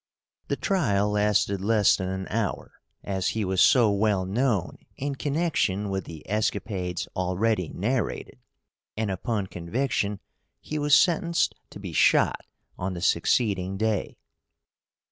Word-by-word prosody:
The - - 0
trial 105 - +1
lasted 105 -2 +1
less 105 -1 +4
than 95 -1 -3
an 95 0 -4
hour, 110 -2 -2 0.3
as 95 -2 -1
he 110 - 0
was 95 0 +1
so 120 -5 +5
well 100 -2 +1
known 105 -1 -1 0.2
in 140 +1 -2
connection 135 - -1
with 95 -2 -2
the 80 -2 -10
escapades 100 -3 -2
already 95 0 0
narrated, 115 +5 -2 0.6
and 110 -2 -1
upon 105 +1 -2
conviction 100 +3 -2 0.4
he 155 - -4
was 145 -1 +5
sentenced 170 -1 +2 0.2
to - - -11
be - - -7
shot - - +3 0.4
on 90 0 -3
the 85 - -6
succeeding 95 +1 +1
day. 110 -1 -1
100 Hz, 130 wpm, -26 LUFS, 95-115 Hz, 0.6 s, so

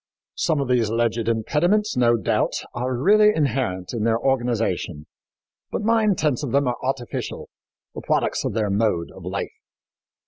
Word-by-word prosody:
Some 160 -3 0
of 140 - -1
these 120 -4 +2
alleged 115 0 0
impediments, 175 - +1
no 120 -1 +3
doubt, 105 - 0 0.2
are 125 +1 -2
really 210 - +5
inherent 125 - -1
in 115 -3 -2
their 115 0 +2
organization, 115 - -1 0.7
but - - -2
nine 220 -2 +3
tenths 150 -6 0
of 140 -5 -4
them 140 0 +2
are 125 - -1
artificial 130 -2 -4 0.4
the - - -7
products - - 0
of - - -2
their 105 -3 0
mode 100 -5 0
of - - -13
life. - - -4
120 Hz, 160 wpm, -23 LUFS, 115-145 Hz, 0.7 s, really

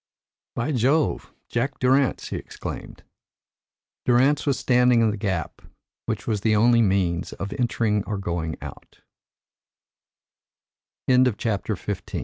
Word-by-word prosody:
"By 120 +6 -1
Jove! 140 +4 +1 0.2
Jack 135 +4 -2
Durrance," 130 +1 +2
he - - -3
exclaimed. - - -8 1.0
Durrance 135 +5 +3
was 140 - +2
standing 125 -2 +3
in 110 -1 +3
the - - -3
gap, 95 -5 -3 0.5
which - - -3
was 105 -3 -1
the 110 0 +2
only 115 +2 +5
means 95 -4 0
of 100 - -5
entering 115 -5 0
or 105 - -3
going 85 -4 -3
o - - -8
115 Hz, 110 wpm, -24 LUFS, 100-125 Hz, 1.0 s, only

